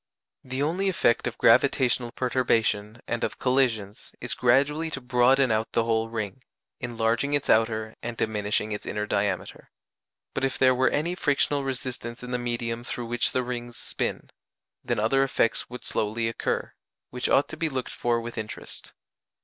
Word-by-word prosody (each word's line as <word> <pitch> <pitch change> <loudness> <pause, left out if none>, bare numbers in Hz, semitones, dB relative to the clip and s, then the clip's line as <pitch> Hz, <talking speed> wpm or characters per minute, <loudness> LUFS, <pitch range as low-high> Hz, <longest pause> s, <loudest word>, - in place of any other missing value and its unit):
The 130 +2 -2
only 180 +6 +1
effect 145 -10 +2
of - - -4
gravitational 120 -1 +4
perturbation 115 -4 0
and 120 - -2
of - - -2
collisions 120 -6 0
is - - -3
gradually 140 +6 +2
to 145 - -4
broaden 125 +1 +3
out 110 +1 0
the 115 - +3
whole 115 0 0
ring, 115 +2 -4 0.4
enlarging 120 +4 0
its 145 - +1
outer 110 0 +2
and 120 0 -5
diminishing 105 0 0
its 105 - -5
inner 105 0 -2
diameter. 100 -2 -2 0.6
But - - -2
if 135 -1 0
there 130 -1 +5
were 130 +1 +3
any 165 +4 0
frictional 145 -4 +1
resistance 125 -2 -5
in 125 - -6
the 125 - 0
medium 120 -1 -2
through 120 0 -4
which 120 0 +1
the 130 - 0
rings 120 -1 -5
spin, - - -3 0.5
then - - -1
other 115 +6 +3
effects 125 -4 +1
would 125 +1 -8
slowly 110 +2 0
occur, 115 - -2 0.4
which 125 0 -2
ought 140 - +4
to 155 - -7
be 160 0 0
looked 130 -3 -4
for 120 -1 +1
with 115 0 -6
interest. 110 0 -8
120 Hz, 165 wpm, -26 LUFS, 115-130 Hz, 0.6 s, there